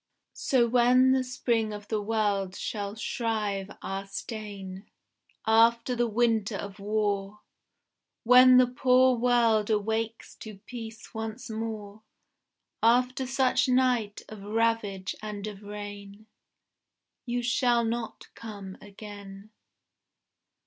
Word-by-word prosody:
So 250 Hz, -4 st, +2 dB
when 250 Hz, +2 st, +4 dB
the 260 Hz, 0 st, +2 dB
spring 235 Hz, -3 st, -1 dB
of 205 Hz, 0 st, -8 dB
the 215 Hz, -1 st, -1 dB
world 205 Hz, -3 st, -1 dB
shall 205 Hz, -1 st, -4 dB
shrive 215 Hz, -4 st, -2 dB
our 195 Hz, +1 st, -4 dB
stain, 200 Hz, -3 st, -7 dB, 0.6 s
After 230 Hz, +2 st, +4 dB
the 240 Hz, 0 st, +1 dB
winter 225 Hz, -2 st, +1 dB
of 200 Hz, 0 st, -7 dB
war, 205 Hz, 0 st, -2 dB, 0.8 s
When 250 Hz, +1 st, +8 dB
the 255 Hz, -, +7 dB
poor 255 Hz, +1 st, +3 dB
world 230 Hz, -3 st, +2 dB
awakes 220 Hz, +1 st, -2 dB
to 215 Hz, -2 st, -10 dB
peace 225 Hz, -3 st, -9 dB
once 225 Hz, +2 st, -6 dB
more, 220 Hz, -2 st, -6 dB, 0.8 s
After 250 Hz, +3 st, +2 dB
such 260 Hz, 0 st, +2 dB
night 250 Hz, -5 st, +1 dB
of 215 Hz, -2 st, -10 dB
ravage 210 Hz, -2 st, -1 dB
and 210 Hz, -1 st, -6 dB
of 210 Hz, -2 st, -7 dB
rain, 205 Hz, 0 st, -9 dB, 1.0 s
You 245 Hz, 0 st, -1 dB
shall 240 Hz, -1 st, +2 dB
not 230 Hz, 0 st, -4 dB
come 200 Hz, -4 st, -9 dB
again. 205 Hz, 0 st, -11 dB
220 Hz, 110 wpm, -28 LUFS, 205-240 Hz, 1.0 s, When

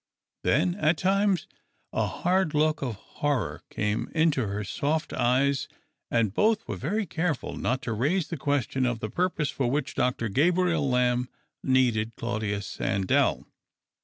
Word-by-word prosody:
Then 170 Hz, +7 st, +2 dB
at 160 Hz, -4 st, +2 dB
times 195 Hz, -2 st, +2 dB, 0.5 s
a -, -, +1 dB
hard 180 Hz, -3 st, 0 dB
look 155 Hz, 0 st, +2 dB
of 125 Hz, -5 st, -2 dB
horror 135 Hz, +3 st, -2 dB
came 105 Hz, +1 st, -1 dB
into 155 Hz, -8 st, +2 dB
her 100 Hz, +1 st, -3 dB
soft 150 Hz, -, -1 dB
eyes, 130 Hz, +3 st, +2 dB, 0.4 s
and 115 Hz, -4 st, +1 dB
both 220 Hz, -, +2 dB
were -, -, -3 dB
very 205 Hz, +9 st, -1 dB
careful 165 Hz, -3 st, -2 dB
not 130 Hz, +2 st, -1 dB
to 115 Hz, -, -2 dB
raise 150 Hz, -, 0 dB
the 170 Hz, -, -3 dB
question 135 Hz, -3 st, 0 dB
of 120 Hz, -2 st, -1 dB
the 110 Hz, -1 st, -4 dB
purpose 175 Hz, -5 st, 0 dB
for 130 Hz, -3 st, -1 dB
which 145 Hz, +2 st, -1 dB
Dr. 125 Hz, -2 st, 0 dB
Ga])riel 165 Hz, -, +2 dB
Lamb 125 Hz, 0 st, +2 dB, 0.3 s
needed 120 Hz, -4 st, +2 dB
Claudius 110 Hz, -4 st, -2 dB
Sandell. 95 Hz, 0 st, +1 dB
140 Hz, 145 wpm, -27 LUFS, 120-165 Hz, 0.5 s, Then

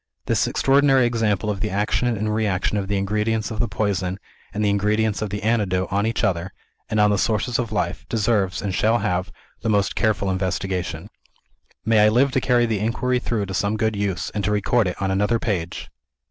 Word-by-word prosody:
This -, -, +1 dB
extraordinary 135 Hz, -1 st, +3 dB
example 110 Hz, -4 st, 0 dB
of 100 Hz, -, -4 dB
the 105 Hz, +1 st, -1 dB
action 105 Hz, +5 st, 0 dB
and 110 Hz, -2 st, -1 dB
reaction 105 Hz, -2 st, 0 dB
of 100 Hz, -2 st, -1 dB
the 100 Hz, 0 st, 0 dB
ingredients 105 Hz, +3 st, -1 dB
of 110 Hz, -, -5 dB
the 120 Hz, -, +1 dB
poison 95 Hz, -2 st, -1 dB, 0.3 s
and 105 Hz, +1 st, -1 dB
the -, -, +3 dB
ingredients 105 Hz, +1 st, +1 dB
of 110 Hz, -, -2 dB
the 105 Hz, +2 st, -5 dB
antidote 100 Hz, -5 st, +1 dB
on 100 Hz, +2 st, +1 dB
each 115 Hz, -, -2 dB
other, 90 Hz, +1 st, 0 dB, 0.4 s
and 110 Hz, -, 0 dB
on 105 Hz, 0 st, +4 dB
the 100 Hz, -, +1 dB
sources 115 Hz, +4 st, 0 dB
of 115 Hz, -3 st, -2 dB
life, 90 Hz, -5 st, -2 dB
deserves, 105 Hz, -4 st, 0 dB
and 100 Hz, -2 st, -2 dB
shall 110 Hz, +5 st, +2 dB
have, 90 Hz, -1 st, -1 dB, 0.3 s
the 110 Hz, -, -1 dB
most 100 Hz, -2 st, +1 dB
careful 105 Hz, -4 st, +1 dB
investigation. 95 Hz, -2 st, -2 dB, 0.8 s
May 110 Hz, 0 st, +4 dB
I 105 Hz, 0 st, +6 dB
live 130 Hz, +5 st, +3 dB
to 130 Hz, 0 st, +1 dB
carry 120 Hz, -2 st, +3 dB
the 110 Hz, -3 st, -1 dB
inquiry 125 Hz, +4 st, 0 dB
through 115 Hz, -4 st, -2 dB
to 95 Hz, -, -6 dB
some 100 Hz, +4 st, 0 dB
good 110 Hz, 0 st, 0 dB
use, 100 Hz, -3 st, -2 dB
and 105 Hz, -, -3 dB
to 100 Hz, -, +1 dB
record 105 Hz, +1 st, +2 dB
it 90 Hz, -, -4 dB
on 95 Hz, -1 st, -1 dB
another 105 Hz, +4 st, +1 dB
page!" 90 Hz, -6 st, -3 dB
105 Hz, 205 wpm, -22 LUFS, 95-110 Hz, 0.8 s, I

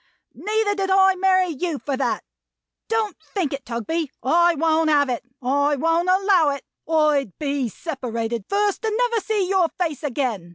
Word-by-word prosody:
Neither 430 Hz, -1 st, 0 dB
did 390 Hz, -1 st, -2 dB
I 385 Hz, 0 st, +5 dB
marry 370 Hz, -1 st, +2 dB
you 325 Hz, 0 st, -3 dB
for 275 Hz, 0 st, -3 dB
that. 255 Hz, -3 st, -1 dB, 0.6 s
Don't 445 Hz, -3 st, -1 dB, 0.2 s
think 350 Hz, -9 st, 0 dB
it, 275 Hz, -1 st, -6 dB
Tugby. 275 Hz, +7 st, -2 dB
I 345 Hz, +5 st, +4 dB
won't 320 Hz, +1 st, +2 dB
have 285 Hz, -2 st, +3 dB
it. 245 Hz, -, -2 dB, 0.2 s
I 285 Hz, +3 st, +2 dB
won't 330 Hz, +5 st, +1 dB
allow 375 Hz, -4 st, +4 dB
it. 280 Hz, -1 st, -4 dB, 0.3 s
I'd 300 Hz, -, +2 dB
be 280 Hz, -4 st, -1 dB
separated 235 Hz, -, -4 dB
first, 405 Hz, +1 st, 0 dB
and 435 Hz, -1 st, 0 dB
never 475 Hz, -2 st, +1 dB
see 415 Hz, -4 st, 0 dB
your 375 Hz, -2 st, +3 dB
face 320 Hz, -6 st, -1 dB
again. 245 Hz, -, -2 dB
320 Hz, 165 wpm, -22 LUFS, 275-385 Hz, 0.6 s, I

